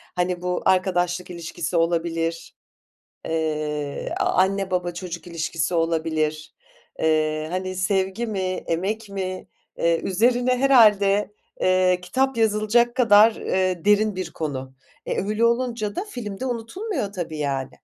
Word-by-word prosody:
Hani, 180 0 -1
bu 180 0 -2
arkadaşlık 180 -1 +1
ilişkisi 170 0 -5
olabilir, 165 0 -1 0.7
eee, 150 -2 -2
a - - +3
anne, 195 +1 +1
baba, 180 -1 -1
çocuk 175 -2 -7
ilişkisi 165 0 -2
olabilir, 160 -2 -1 0.4
eee, 155 0 +1
hani, 185 +1 -3
sevgi 190 +4 0
mi 215 -3 -3 0.3
emek 205 +6 -2
mi, 185 -1 -5 0.3
eee, 170 0 +2
üzerine 245 +5 +2
herhâde, 210 -6 +4 0.3
eee, 185 -1 +3
kitap 265 +8 0
yazılacak 225 +2 +2
kadar, 225 -3 +6
eee, 185 -2 -1
derin 210 0 +3
bir 185 -3 -4
konu. 135 -4 -5 0.3
E, - - -1
öyle, 215 +3 0
olunca 235 -3 0
da 395 - -2
film 220 - -7
de 260 - -2
unutulmuyor 245 - -3
tabii 165 -5 -5
yani. 135 -3 -2
185 Hz, 130 wpm, -23 LUFS, 165-215 Hz, 0.7 s, kadar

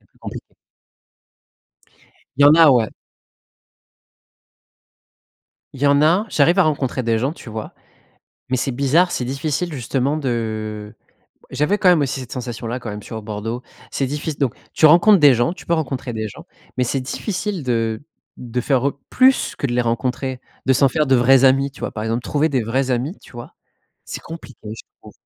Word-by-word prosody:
C'est - - -31
plus - - -33
compliqué. - - -9 1.8
Il 140 - +3
y - - +8
en 145 - +8
a, 160 -3 +7
ouais. 120 -4 +3 2.9
Il 135 - -10
y - - +4
en 140 0 +4
a. 175 +7 +3
J'arrive 170 +6 +3
à - - +7
rencontrer 135 -5 -1
des 115 -1 +1
gens, 135 +6 -1
tu 125 - -11
vois? 110 0 -7 0.8
Mais 130 - +1
c'est 135 +2 -1
bizarre, 140 +8 +2
c'est 125 - -2
difficile 155 +6 -2
justement 135 +2 -1
de 110 -5 -4 0.6
j'avais 185 +8 0
quand 185 - +3
même, 175 -4 +5
aussi, 135 -1 -2
cette 125 - -9
sensation-là, 120 -1 -5
quand 120 - -7
même, 105 0 -7
sur 110 0 -7
Bordeaux, 110 +3 -5 0.3
c'est 135 - -1
diffic 145 +2 -4
donc 135 -5 0 0.2
tu 155 - +4
rencontres 175 +6 +6
des 145 -5 +6
gens, 120 +8 +1
tu - - -13
peux 170 - +2
rencontrer 135 -6 -3
des 110 -1 -3
gens, - - -13 0.3
mais 125 - +3
c'est 135 +2 -1
difficile 185 - -4
de 115 -3 -1 0.4
de 125 0 -4
faire 135 0 +2
re 140 - +1 0.2
plus 260 +1 +3
que - - -2
de 120 - -3
les 125 0 +1
rencontrer, 125 +2 -2 0.2
de 135 - +3
s'en 135 +1 +4
faire 150 +3 0
de 130 -1 +4
vrais 130 +2 +5
amis, 135 +1 +4
tu - - -16
vois, - - -3
par 110 - -5
exemple, 115 +2 -2
trouver 150 +4 0
des 135 -5 0
vrais 130 +4 -1
amis, 130 - -2
tu - - -17
vois? 120 0 -10 0.5
C'est - - -7
compliqué, 160 -6 -11
je 110 +2 -7 0.2
trouve. - - -13
130 Hz, 190 wpm, -20 LUFS, 120-150 Hz, 2.9 s, y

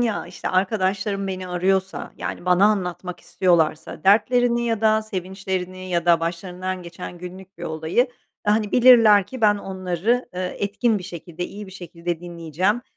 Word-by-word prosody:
ya, 230 -7 0
işte, 175 0 -6
arkadaşlarım 195 +1 0
beni 185 -1 -4
arıyorsa, 190 +2 -1
yani, - - -5
bana 180 +2 +4
anlatmak 180 -3 -2
istiyorlarsa 160 -4 0
dertlerini 235 +4 +3
ya 225 -2 0
da 220 0 +3
sevinçlerini 185 -2 -4
ya 170 -1 0
da 170 -1 +5
başlarından 180 +2 -4
geçen 175 +1 -8
günlük 185 +2 -10
bir - - -10
olayı, 160 - 0 0.4
hani, 210 0 +2
bilirler 230 -6 +7
ki 255 +4 -8
ben 210 -2 +5
onları, 190 +6 -1
eee, 180 0 -3
etkin 210 +2 +1
bir 185 - -9
şekilde, 175 -1 -7
iyi 205 0 -9
bir 190 - -12
şekilde 170 -2 -5
dinleyeceğim 175 +5 -1
185 Hz, 155 wpm, -23 LUFS, 175-210 Hz, 0.4 s, bilirler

